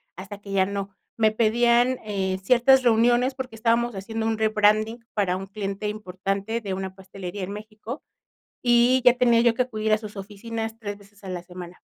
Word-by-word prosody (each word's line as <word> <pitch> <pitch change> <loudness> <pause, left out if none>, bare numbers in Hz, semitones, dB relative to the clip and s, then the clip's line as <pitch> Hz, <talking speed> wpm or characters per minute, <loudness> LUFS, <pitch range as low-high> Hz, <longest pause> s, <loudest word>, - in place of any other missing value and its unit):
hasta 195 +3 -9
que 200 -1 -10
ya 195 -1 +3
no. 200 0 -5 0.2
Me 220 -1 +3
pedían, 235 +3 +3
eh, 190 -3 -2
ciertas 250 +6 +5
reuniones 240 +2 +3
porque 260 -3 -6
estábamos 235 +1 +1
haciendo 220 +3 -4
un 225 -1 0
rebranding 215 +2 +2
para 195 -4 +1
un 195 - -6
cliente 200 +1 -4
importante 200 +2 -3
de 200 -3 -4
una 190 0 -5
pastelería 190 0 -7
en 185 - -5
México, 215 +5 -8 0.6
y 245 +1 +4
ya 245 - +8
tenía 240 -2 +4
yo 235 -1 +4
que 240 - 0
acudir 220 -3 -1
a - - +4
sus 215 -1 -9
oficinas 225 +3 -5
3 205 -2 -5
veces 200 0 -20
a 190 - -7
la 180 -1 -4
semana. 180 0 -10
215 Hz, 185 wpm, -24 LUFS, 195-235 Hz, 0.6 s, ya